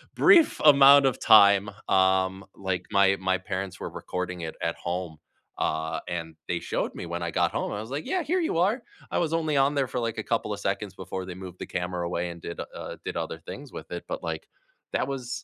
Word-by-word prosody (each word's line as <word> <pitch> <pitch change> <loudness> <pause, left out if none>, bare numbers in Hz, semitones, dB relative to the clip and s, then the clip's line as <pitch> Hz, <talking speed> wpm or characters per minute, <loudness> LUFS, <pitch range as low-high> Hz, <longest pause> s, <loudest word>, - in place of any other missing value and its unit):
brief 335 -6 +6
amount 140 -1 +8
of 130 - +2
time. 100 -1 +6 0.2
Um, 95 0 +2
like, 95 -2 -3
my 100 0 +4
my 95 0 +1
parents 95 0 -5
were - - -4
recording 90 -1 -5
it 80 -1 -5
at 85 - -1
home. 85 -2 -4 0.4
Uh, 80 +1 -1
and 80 -2 -4
they 85 - -1
showed - - -3
me - - -6
when 85 +1 -4
I 85 - -1
got - - +1
home, - - -2
I 105 - -3
was 110 +3 -9
like, 145 +3 -3
"Yeah, 370 - 0
here 360 +5 +1
you 320 - 0
are." 200 +9 +2 0.3
I - - 0
was 165 -2 0
only 160 -2 0
on 140 +2 +3
there 140 -2 +1
for, 125 0 -3
like, 115 -1 -2
a 110 - -2
couple 115 -1 -1
of 100 - -6
seconds 100 0 -2
before 95 0 -5
they 90 -1 -7
moved 95 -1 -9
the - - -4
camera 90 -1 -3
away 85 0 -2
and 85 -1 -11
did, 85 - -7
uh, - - -7
did - - -4
other - - -3
things - - -9
with - - -9
it. 85 - -5
But, - - -4
like, 80 -1 -4 0.5
that - - 0
was 130 -3 -4
95 Hz, 230 wpm, -27 LUFS, 90-130 Hz, 0.5 s, amount